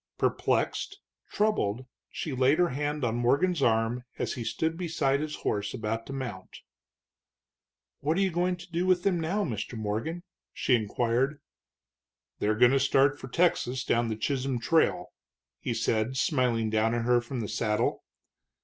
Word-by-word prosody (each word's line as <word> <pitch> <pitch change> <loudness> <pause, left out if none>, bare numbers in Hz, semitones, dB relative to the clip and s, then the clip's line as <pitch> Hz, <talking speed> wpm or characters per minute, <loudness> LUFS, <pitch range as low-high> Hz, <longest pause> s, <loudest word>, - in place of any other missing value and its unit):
Perplexed, 400 - 0 0.3
troubled, 130 - 0 0.2
she 155 - -4
laid 130 +3 +3
her 175 -1 +3
hand 145 +2 -2
on 115 -2 +1
Morgan's 140 +8 +2
arm 115 0 +2
as - - -2
he 120 - -5
stood 160 +8 -1
beside 160 -6 0
his 150 0 -3
horse 105 0 -1
about 115 +1 -3
to 135 - -6
mount. 120 -9 -6 1.4
"What 155 +4 0
are - - +2
you 190 -1 +2
going 180 +2 +1
to 175 0 -13
do 175 +2 0
with 180 -1 +3
them 185 -3 +2
now, 185 +6 0
Mr. 115 - -4
Morgan?" 110 +12 -3 0.3
she 130 - +1
inquired. 120 +5 +1 1.0
"They're 105 +1 +1
going 120 +1 +6
to 135 - +3
start 140 +1 +3
for - - -8
Texas 130 -4 +1
down 120 -2 +1
the 110 - -2
Chisholm 130 +2 -1
Trail," 160 +8 +1 0.5
he - - -3
said, 115 +3 0
smiling 125 -7 +1
down 110 +1 +2
at 115 -1 -1
her 120 0 +4
from 120 0 -5
the 105 - -3
saddle. 105 0 0
130 Hz, 160 wpm, -28 LUFS, 115-160 Hz, 1.4 s, going